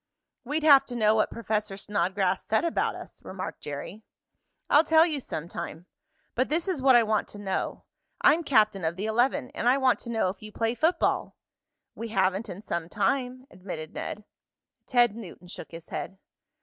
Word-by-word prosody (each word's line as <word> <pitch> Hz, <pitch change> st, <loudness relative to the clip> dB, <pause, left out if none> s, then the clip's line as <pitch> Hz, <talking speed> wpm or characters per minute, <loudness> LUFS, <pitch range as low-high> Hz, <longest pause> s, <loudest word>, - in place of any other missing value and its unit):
"We'd 295 Hz, +5 st, -2 dB
have 285 Hz, -3 st, +8 dB
to 245 Hz, -, -6 dB
know 215 Hz, -2 st, +4 dB
what 215 Hz, -1 st, +2 dB
Professor 215 Hz, -3 st, -2 dB
Snodgrass 190 Hz, -1 st, 0 dB
said 220 Hz, +9 st, +1 dB
about 335 Hz, -, 0 dB
us," -, -, -11 dB
remarked 185 Hz, 0 st, -6 dB
Jerry. 150 Hz, +8 st, -6 dB, 0.7 s
"I'll 295 Hz, +2 st, +6 dB
tell 320 Hz, 0 st, +5 dB
you 310 Hz, -4 st, -1 dB
some 165 Hz, -, -5 dB
time. 170 Hz, -1 st, -7 dB, 0.5 s
But 255 Hz, +2 st, 0 dB
this 330 Hz, +5 st, 0 dB
is 360 Hz, -8 st, -1 dB
what 260 Hz, -1 st, +6 dB
I 240 Hz, -, +7 dB
want 215 Hz, -1 st, 0 dB
to -, -, -9 dB
know. 195 Hz, -2 st, -3 dB, 0.4 s
I'm 330 Hz, +3 st, +4 dB
captain 215 Hz, -, +3 dB
of 160 Hz, +1 st, 0 dB
the 195 Hz, +3 st, -3 dB
eleven, 250 Hz, +4 st, +1 dB
and 240 Hz, -, 0 dB
I 260 Hz, -, +4 dB
want 260 Hz, -2 st, +3 dB
to 235 Hz, -, -8 dB
know 225 Hz, -5 st, +1 dB
if 190 Hz, +1 st, -7 dB
you 215 Hz, 0 st, -9 dB
play 225 Hz, +2 st, 0 dB
football?" 325 Hz, +7 st, +1 dB, 0.6 s
"We 230 Hz, -, -6 dB
haven't 195 Hz, 0 st, 0 dB
in 185 Hz, +2 st, -7 dB
some 170 Hz, -5 st, -4 dB
time," 255 Hz, +4 st, -1 dB
admitted 180 Hz, -4 st, -7 dB
Ned. 210 Hz, -, -5 dB, 0.6 s
Ted 240 Hz, -4 st, +3 dB
Newton 185 Hz, -5 st, -10 dB
shook -, -, -9 dB
his 165 Hz, 0 st, -11 dB
head. 195 Hz, -, -5 dB
220 Hz, 185 wpm, -27 LUFS, 190-260 Hz, 0.7 s, have